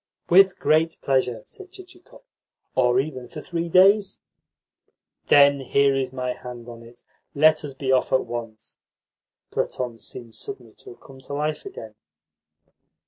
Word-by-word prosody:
"With 190 +1 +6
great 160 +1 +1
pleasure," 125 -5 0
said 380 -2 -13
Chichikov. 375 +6 -16 0.5
"Or 125 -1 +3
even 130 -3 -4
for 150 - -9
three 170 +1 -4
days." 195 +3 +4 1.1
"Then 140 -1 +6
here 140 +1 +2
is 135 -1 -2
my 125 -1 -3
hand 125 -1 -10
on 120 -1 -10
it. 120 +1 -16 0.3
Let 155 +2 +4
us 140 -2 -7
be 135 -1 -2
off 130 -1 +2
at 130 - +2
once." 115 -2 -8 0.7
Platon 120 -3 -3
seemed 115 -1 -8
suddenly 405 - -9
to 390 -2 -12
have - - -33
come 135 -1 -15
to 135 - -8
life 150 - -3
again. 385 - -10
140 Hz, 145 wpm, -23 LUFS, 125-170 Hz, 1.1 s, With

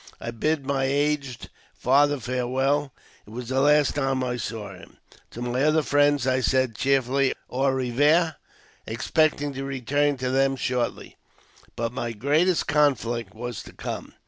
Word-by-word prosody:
I 120 - -5
bid 145 +5 -1
my 135 -1 0
aged 140 -2 -1 0.2
father 145 +2 +3
farewell 130 +4 -1 0.2
— - - -29
it - - -13
was 120 +2 -7
the 135 0 +1
last 150 +1 +4
time 135 -2 0
I 125 -1 -2
saw 110 -4 -5
him. 95 - -15 0.3
To 120 - -7
my 125 +1 -1
other 155 +1 +3
friends 145 -2 +2
I 130 0 +2
said 130 -2 +1
cheerfully 135 +1 +1 0.2
au 135 +2 +1
revoir, 145 +6 +2 0.5
expect 145 +7 +1
ing 145 -1 -3
to 135 0 -5
return 135 +2 0
to 130 0 -2
them 135 +1 +2
shortly. 125 -2 -3 0.6
But 115 0 -2
my 120 -2 -3
greatest 155 - +2
conflict 120 -8 +1
was 120 0 -5
to - - -13
come. - - -6
135 Hz, 160 wpm, -25 LUFS, 125-145 Hz, 0.6 s, last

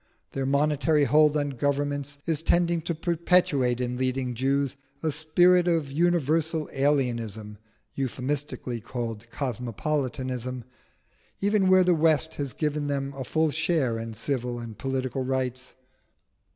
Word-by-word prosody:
Their 135 -1 -2
monetary 150 +2 +2
hold 150 +3 +4
on 145 -1 -1
governments 140 +1 -1
is 160 -2 0
tending 170 0 +2
to 170 - 0
perpetuate 160 -7 +2
in 125 0 -2
leading 130 -1 -1
Jews 135 +2 0 0.3
a 160 - +1
spirit 175 +4 +4
of 165 -5 +1
universal 160 0 +1
alienism 120 -7 -1 0.4
(euphemistically 130 -2 -3
called 115 -1 -5
cosmopolitanism), 125 0 -3 0.8
even 200 -1 +2
where 185 0 +6
the 180 0 +4
West 160 -1 +2
has 140 -3 -3
given 150 -1 -1
them 140 -1 -2
a 135 -1 -5
full 155 +4 +1
share 150 -7 0
in 115 -1 -6
civil 125 +1 -2
and 115 -2 -7
political 130 -1 -2
rights. 130 -1 -3
140 Hz, 125 wpm, -26 LUFS, 125-155 Hz, 0.8 s, where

